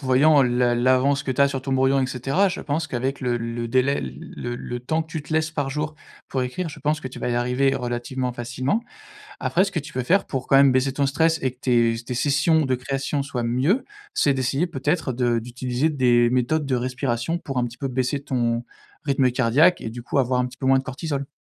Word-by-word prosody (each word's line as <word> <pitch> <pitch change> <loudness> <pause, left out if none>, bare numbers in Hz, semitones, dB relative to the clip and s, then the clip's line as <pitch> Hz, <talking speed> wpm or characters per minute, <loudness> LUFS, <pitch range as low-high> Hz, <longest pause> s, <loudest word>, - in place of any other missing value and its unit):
voyant 140 +2 +5
l'a 125 -1 +2
l'avance 130 +3 +2
que 135 - -3
tu 130 - -1
as 140 - +5
sur 135 -1 -3
ton 135 0 -3
brouillon, 135 +1 +3
et 130 - +1
cetera. 135 +10 +1
Je - - -4
pense 155 +2 -2
qu'avec 130 +3 -3
le 125 -2 0
le 115 0 -4
délai 130 +3 +2
le 120 - -6
le 120 0 -5
temps 155 +6 -1
que 160 - -17
tu 160 - -3
te 150 - -8
laisses 160 0 +1
par 145 -3 -2
jour 150 +2 -3 0.3
pour 130 - -1
écrire, 145 +8 -3
je 150 - -11
pense 150 +2 0
que 130 - -5
tu 130 - -10
vas - - -2
y 120 - 0
arriver 125 +3 +1
relativement 125 +1 -3
facilement. 125 - -2 0.6
Après, 185 +3 +2
ce 195 - -4
que 170 - -1
tu 150 +1 -9
peux 130 -2 -2
faire 195 +9 +2
pour 135 -2 -4
quand - - +4
même 135 0 +7
baisser 130 +1 +1
ton 140 0 +1
stress 160 +4 +2
et 130 - 0
que 125 - -25
tes 120 -3 +3
s 115 +1 -7
tes 125 - -4
sessions 150 +4 +2
de 130 -1 +1
création 135 +3 -2
soient 135 -3 -3
mieux, 130 - +1 0.3
c'est 140 - +3
d'essayer 135 +4 0
peut-être 150 -1 -1
de 120 -1 +1
d'utiliser 125 +4 -2
des 120 -5 +3
méthodes 130 +5 +1
de 135 -2 0
respiration 125 +4 -1
pour 135 -5 -6
un 125 - +2
petit 120 +1 -8
peu 135 - -3
baisser 130 +2 -1
ton 120 -3 0 0.4
rythme 135 -2 +3
cardiaque 135 +8 +4
et - - -4
du 120 +1 -8
coup 135 - -2
avoir 125 -1 +1
un 125 - +1
petit 125 0 -13
peu 130 - -5
moins 135 0 +5
de - - -5
cortisol. 140 +1 -4
130 Hz, 240 wpm, -23 LUFS, 125-145 Hz, 0.6 s, même